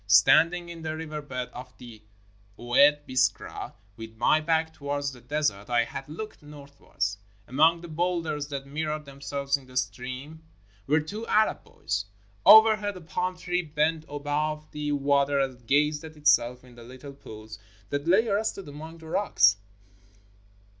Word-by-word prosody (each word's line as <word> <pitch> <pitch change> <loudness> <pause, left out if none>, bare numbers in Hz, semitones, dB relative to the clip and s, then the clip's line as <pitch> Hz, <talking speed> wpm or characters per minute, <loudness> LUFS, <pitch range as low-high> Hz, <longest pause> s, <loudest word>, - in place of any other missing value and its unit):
Standing 165 - +5
in 170 -1 -9
the 155 0 -4
river 155 -1 -5
bed 125 -4 -5
of 125 +1 -10
the 115 -3 -12 0.6
Oued 145 +5 +4
Biskra 125 -3 -1 0.2
with 110 0 -10
my 135 +7 +4
back 160 0 0
towards 145 -1 -3
the 125 -2 -14
des 145 0 0
ert 100 +3 -14
I 120 -1 +3
had 135 +4 -8
looked 215 +8 -8
northwards. 140 -9 -5 0.3
Among 160 +6 +3
the 175 - -9
boulders 165 -3 -2
that 140 -2 -5
mirrored 150 +1 -3
themselves 140 0 -2
in 135 -2 -17
the 130 0 -8
stream 130 +5 -4 0.5
were 150 +2 +3
two 210 +9 -7
Arab 215 0 +2
boys. 100 +1 -4 0.4
Overhead, 215 -2 +7
a - - -10
palm 180 +3 -3
tree 180 0 -1
bent 155 0 -1
above 150 +1 -3
the 150 -1 -3
water 140 0 +2
and 130 -3 -3
gazed 150 +3 +2
at 160 -1 -10
itself 125 -4 +3
in 125 -1 -16
the 120 0 -13
little 130 +4 -11
pools 110 -5 -11 0.3
that 145 +2 -2
lay 205 +7 +4
arrested 200 -3 -1
among 155 +3 -9
the 160 -1 -13
rocks. 105 - +3
145 Hz, 160 wpm, -27 LUFS, 130-160 Hz, 0.6 s, Overhead